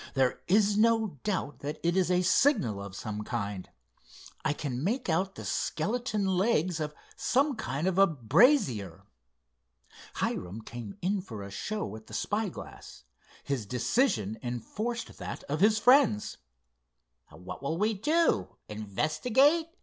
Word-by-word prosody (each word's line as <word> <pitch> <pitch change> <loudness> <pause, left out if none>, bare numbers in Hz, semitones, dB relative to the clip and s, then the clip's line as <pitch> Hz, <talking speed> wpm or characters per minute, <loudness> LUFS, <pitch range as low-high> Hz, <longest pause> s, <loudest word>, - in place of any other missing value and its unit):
"There 130 -2 +1
is 205 +2 +3
no 220 - +2
doubt 185 -8 -2
that 145 +2 -5
it 170 +1 +2
is 185 -2 +2
a 180 0 +3
signal 175 - +3
of 100 -1 -8
some 105 0 -5
kind. 100 -3 -4 0.7
I 135 - +1
can 140 -3 -3
make 235 +5 -1
out 185 +4 0
the - - -8
skeleton 215 +4 -1
legs 185 -3 +1
of 150 -1 -3 0.2
some 275 +2 +1
kind 150 - -3
of 190 0 +1
a 195 - +7
brazier." 125 - +2 1.1
Hiram 95 +5 -3
came 115 -4 -8
in 195 +2 +1
for 110 - -8
a 100 - -8
show 155 - -4
at 110 0 -12
the - - -8
spyglass. 210 - -4 0.4
His 130 -7 -3
decision 115 - +1
enforced 215 - -4
that - - -6
of 150 +2 -3
his 215 +1 +5
friends. 245 - +4 0.9
"What 90 +1 -9
will 140 +4 -2
we 215 +4 +2
do—investigate?" 250 - +1
170 Hz, 135 wpm, -29 LUFS, -, 1.1 s, a